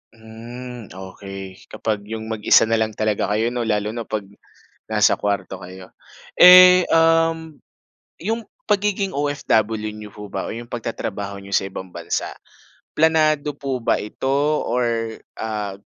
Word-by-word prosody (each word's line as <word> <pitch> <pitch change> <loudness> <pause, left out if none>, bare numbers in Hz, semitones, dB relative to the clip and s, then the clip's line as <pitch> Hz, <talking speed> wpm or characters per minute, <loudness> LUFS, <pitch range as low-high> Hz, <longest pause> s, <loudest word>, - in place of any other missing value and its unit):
Hmm, 115 +1 -10
okey. 95 0 -10
Kapag 110 -2 -3
'yong 110 0 -6
mag-isa 105 -1 +4
na 115 0 +1
lang 110 -1 -1
talaga 110 -1 0
kayo 110 +3 0
no 120 -2 -2
lalo 105 -1 0
na 115 0 -6
'pag 110 -1 -3 0.7
nasa 105 -1 +4
kuwarto 100 -2 -3
kayo. 90 0 -12 0.4
Eh, 180 0 +9
um, 165 -1 +2 0.6
'yong 225 +5 -4 0.2
pagiging 200 - 0
OFW 140 - 0 0.2
niyo 105 0 -9
po 105 -1 -10
ba 95 -1 -4
o - - -5
yong 120 +1 -8
pagtatrabaho 100 -4 -5
n'yo 100 0 -12
sa 95 - +2
ibang 95 -1 -8
bansa, 85 -1 -3 0.7
planado 155 -2 +3
po 135 -2 -3
ba 115 - 0
ito 105 +5 -5 0.4
or, 115 -2 -1 0.2
ah, 105 -3 -4
110 Hz, 140 wpm, -21 LUFS, 105-145 Hz, 0.7 s, Eh